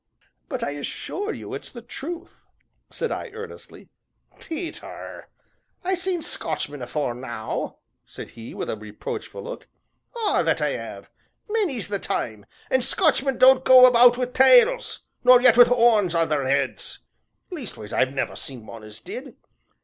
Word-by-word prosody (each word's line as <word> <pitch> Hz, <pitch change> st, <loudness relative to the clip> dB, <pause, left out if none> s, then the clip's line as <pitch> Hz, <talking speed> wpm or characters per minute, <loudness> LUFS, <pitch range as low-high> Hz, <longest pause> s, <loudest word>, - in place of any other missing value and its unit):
"But -, -, -3 dB
I 145 Hz, -, -1 dB
assure 365 Hz, -, -4 dB
you, -, -, -8 dB
it's -, -, -7 dB
the 235 Hz, -2 st, -10 dB
truth," 335 Hz, +8 st, -8 dB, 0.5 s
said 475 Hz, -, -3 dB
I -, -, -4 dB
earnestly. 455 Hz, 0 st, -10 dB, 0.5 s
"Peter, 330 Hz, +1 st, -7 dB, 0.5 s
I 375 Hz, +1 st, 0 dB
seen 365 Hz, -2 st, -1 dB
Scotchmen 145 Hz, -3 st, -3 dB
afore 125 Hz, +1 st, -2 dB
now," 120 Hz, -3 st, -5 dB, 0.3 s
said -, -, -10 dB
he, 115 Hz, 0 st, -10 dB
with -, -, -4 dB
a -, -, -2 dB
reproachful 105 Hz, -, -7 dB
look, -, -, -8 dB, 0.5 s
"ah! 435 Hz, -3 st, +1 dB
that -, -, +1 dB
I -, -, 0 dB
'ave, -, -, -8 dB, 0.4 s
many's 395 Hz, -, -1 dB
the 205 Hz, -1 st, -2 dB
time, 110 Hz, -, -4 dB, 0.2 s
an' 260 Hz, -, +3 dB
Scotchmen 275 Hz, -3 st, +2 dB
don't 260 Hz, 0 st, +6 dB
go 255 Hz, -1 st, +9 dB
about 245 Hz, 0 st, +6 dB
wi' 250 Hz, -, 0 dB
tails, 460 Hz, -, +4 dB, 0.2 s
nor 250 Hz, 0 st, +8 dB
yet 245 Hz, -2 st, +6 dB
wi' 245 Hz, 0 st, +9 dB
'orns 225 Hz, -7 st, +4 dB
on 165 Hz, -1 st, +2 dB
their 145 Hz, -3 st, 0 dB
'eads 140 Hz, +1 st, -1 dB, 0.5 s
leastways 230 Hz, -, -6 dB
I've 130 Hz, -, +2 dB
never 135 Hz, -, -2 dB
seen 125 Hz, -5 st, -6 dB
one 115 Hz, 0 st, -10 dB
as 105 Hz, 0 st, -10 dB
did. 260 Hz, -, -8 dB
245 Hz, 150 wpm, -24 LUFS, -, 0.5 s, go